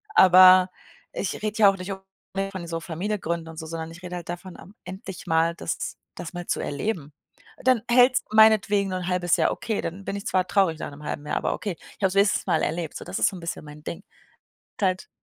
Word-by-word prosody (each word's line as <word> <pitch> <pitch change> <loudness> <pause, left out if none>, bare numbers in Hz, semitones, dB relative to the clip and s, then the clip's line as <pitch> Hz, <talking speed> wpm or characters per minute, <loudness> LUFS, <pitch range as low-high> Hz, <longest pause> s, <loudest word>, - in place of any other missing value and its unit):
Aber 185 0 +8 0.4
ich 195 - -3
rede 215 +1 -3
ja 205 -2 +8
auch 195 - -1
nicht 185 +1 -6
unbedingt 195 0 -6
von 185 -3 -6
so 165 0 -3
Familie 190 +6 -3
gründen 170 -1 -3
und 160 - -11
so, 160 - -6
sondern 165 0 -5
ich 170 +2 -13
rede 180 0 -6
halt 170 - -9
davon, 175 +1 -7
ähm, 195 - -14
endlich 190 0 -8
mal 165 0 +2
das 165 - -4 0.2
das 165 - -7
mal 175 0 -6
zu - - 0
erleben. 150 -1 -3 0.5
Dann 255 -3 +4
hält 250 +1 +6
es - - +1
meinetwegen 215 -2 +5
nur 185 0 -2
'n 180 - -5
1/2 180 -1 +1
Jahr - - +2
okay, 220 -3 -3
dann 180 +4 -5
bin - - -3
ich 200 - -8
zwar 185 -1 +1
traurig 190 -5 +2
nach - - -5
'nem 145 +1 -12
1/2 150 0 -5
Jahr, - - -1
aber - - 0
okay. 200 -6 -4
Ich - - -17
habe 195 - +4
es 185 - -6
wenigstens 200 0 +3
mal 155 - +2
erlebt, 165 -1 -2
so - - -9
das 180 +2 -4
ist - - +4
so - - -9
'n - - -9
bisschen 170 -1 -5
mein 150 0 -12
Ding. 170 - -5 0.8
Und - - -2
halt 185 0 -1
185 Hz, 245 wpm, -25 LUFS, 165-195 Hz, 0.8 s, Aber